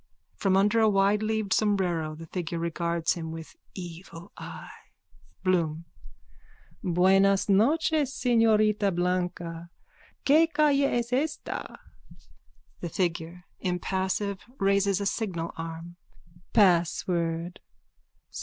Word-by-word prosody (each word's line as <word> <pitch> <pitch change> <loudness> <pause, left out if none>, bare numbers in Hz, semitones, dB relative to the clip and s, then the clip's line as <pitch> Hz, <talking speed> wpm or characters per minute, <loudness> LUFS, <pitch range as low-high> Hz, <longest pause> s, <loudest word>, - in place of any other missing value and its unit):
From 190 -1 +2
under 210 +4 +3
a 220 - +5
wideleaved 210 +1 +1
sombrero 180 -7 0
the 165 +1 -9
figure 170 0 -4
regards 170 0 -1
him 160 -2 -6
with 160 0 -9 0.2
evil 175 +1 -9
eye.)_ - - -9 0.7
BLOOM: 170 -3 0 1.0
Buenas 195 +2 +3
noches, 290 +8 +3
señorita 215 -6 +2
Blanca, 175 -1 -2 0.6
que 315 +4 +5
calle 295 -3 +3
es 240 0 -1
esta? 300 +4 -3 1.0
THE 175 - -4
FIGURE: 170 0 -2 0.2
(Impassive, 190 +2 -2 0.2
raises 200 0 +2
a 200 - -2
signal 185 -6 -2
arm.) 165 +1 -7 0.5
Password. 170 -3 +1
190 Hz, 95 wpm, -27 LUFS, 170-210 Hz, 1.0 s, a